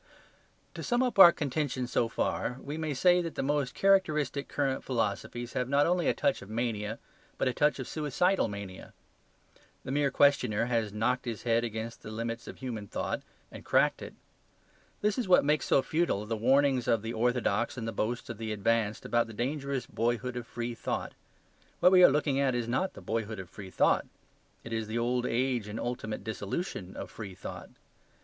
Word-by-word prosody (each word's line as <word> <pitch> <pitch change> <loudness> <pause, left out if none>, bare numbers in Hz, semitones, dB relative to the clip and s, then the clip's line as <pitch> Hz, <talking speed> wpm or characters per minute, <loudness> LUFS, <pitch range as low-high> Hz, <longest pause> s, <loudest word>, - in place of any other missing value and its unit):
To - - -7
sum 245 +1 +1
up 245 -5 -1
our 175 -3 +12
contention 140 -4 -2
so 120 -1 +1
far, 125 +2 -1
we 145 - -5
may 160 -1 -2
say 180 +6 +4
that 165 -2 -5
the - - -1
most 140 -2 0
characteristic 155 -8 +2
current 135 -2 -1
philosophies 120 0 -2
have 125 0 -1
not 140 +1 +4
only 175 0 +1
a - - +4
touch 140 - +1
of 95 - -11
mania, 110 -1 -2 0.4
but - - +1
a 130 - +1
touch 150 +3 +2
of 130 - -5
suicidal 160 +5 +1
mania. 100 -3 -8 0.9
The - - -5
mere 140 0 +2
questioner 125 -6 +3
has 115 -3 0
knocked 115 +5 0
his 115 -3 -4
head 115 -1 +2
against 115 0 -5
the - - -9
limits 115 +1 -4
of - - -8
human 115 -6 -5
thought; - - -3 0.3
and - - -10
cracked - - +2
it. - - -8 0.9
This 210 +4 +1
is 235 - -1
what 180 -5 +5
makes 150 +1 +1
so 135 - +4
futile 155 -11 0
the 115 +1 -2
warnings 130 +2 +3
of 115 -2 +2
the 115 +1 -3
orthodox 120 0 0
and 115 -2 -4
the - - -2
boasts 115 +3 -2
of 115 -2 -7
the 110 -1 -3
advanced 105 0 0
about 120 -1 +1
the 115 - -9
dangerous 135 +3 -2
boyhood 120 +2 -1
of 120 -1 -5
free 120 0 -4
thought. 115 - -3 0.7
What 180 - +6
we 185 -1 +7
are - - +10
looking 140 -1 +1
at 135 -3 +2
is 120 -1 -1
not 130 +11 -1
the - - -10
boyhood 110 -1 -3
of 90 -2 -9
free 100 -2 -9
thought; - - +2 0.6
it 115 - -7
is 110 -1 -2
the 110 +2 -3
old 125 +1 0
age 120 -2 0
and 105 +2 -5
ultimate 120 -4 -4
dissolution 100 - -4
of - - -6
free 100 -4 -8
thought. - - -8
120 Hz, 195 wpm, -30 LUFS, 115-145 Hz, 0.9 s, our